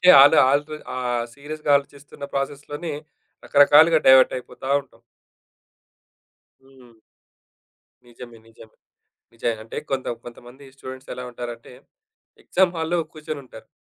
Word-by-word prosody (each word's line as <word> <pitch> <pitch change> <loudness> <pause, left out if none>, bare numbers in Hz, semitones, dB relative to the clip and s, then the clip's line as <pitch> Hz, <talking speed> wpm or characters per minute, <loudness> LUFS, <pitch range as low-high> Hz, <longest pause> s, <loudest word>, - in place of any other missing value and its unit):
ఏంటంటే, 180 - +4
ఆల్ 145 +3 +6
ఆర్ల్ 145 +1 +2 0.3
ఆహ్, 120 -2 -2
సీరియస్‍గా 150 +1 -6
ఆలోచిస్తున్న 140 0 -7
ప్రాసెస్‍లోనే 145 +3 -4 0.5
రకరకాలుగా 155 +3 +6
డైవర్ట్ 130 -1 +7
అయిపోతా 125 +1 -10
ఉంటాం. 135 - -25 1.6
హ్మ్. 130 -4 -20 1.1
నిజమే. 120 -1 -13
నిజమే. 110 -1 -18 0.6
నిజయి 115 0 -2
అంటే 110 - -10
కొంత 135 -1 -2 0.2
కొంతమంది 120 +3 -13
స్టూడెంట్స్ 130 0 -10
ఎలా 125 - -7
ఉంటారంటే? 120 -1 -9 0.7
ఎగ్సామ్ 185 -1 +2
హాల్‍లో 165 +2 -1
కూర్చొనుంటారు. 145 -7 -9
135 Hz, 105 wpm, -22 LUFS, 120-145 Hz, 1.6 s, డైవర్ట్